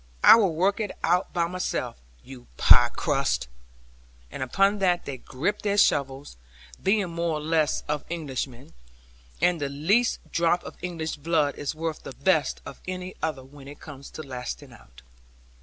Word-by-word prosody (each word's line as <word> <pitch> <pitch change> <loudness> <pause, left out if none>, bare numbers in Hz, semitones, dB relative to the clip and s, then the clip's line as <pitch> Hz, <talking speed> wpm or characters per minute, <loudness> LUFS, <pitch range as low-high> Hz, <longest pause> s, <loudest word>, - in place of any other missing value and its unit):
I - - +11
will 195 -8 +2
work 195 +6 +2
it 210 -2 -1
out 180 +2 +2
by 170 -1 +1
myself, 180 +2 -3 0.3
you 130 -2 -12
pie - - +7
crusts,' - - 0 0.8
and - - -7
upon 195 +11 +2
that 180 -2 +2
they 135 - -5
gripped 170 - -2
their 205 -1 0
shovels, 140 - +1 0.4
being 195 -2 +1
more 170 -1 -1
or - - -4
less 155 0 +1
of 150 -1 -2
Englishmen; 135 -6 -5 0.7
and 175 -3 +3
the 140 - -1
least 195 - +2
drop 170 +1 +2
of - - -9
English 165 -3 -4
blood 150 -1 +1
is 145 +1 -4
worth 160 0 -3
the - - -8
best 155 +2 +1
of - - -10
any 185 0 -5
other 155 -5 -2
when 135 +1 -14
it 145 +1 -11
comes 140 -2 -10
to 155 - -6
lasting 125 - -7
out. - - -17
160 Hz, 165 wpm, -26 LUFS, 140-180 Hz, 0.8 s, I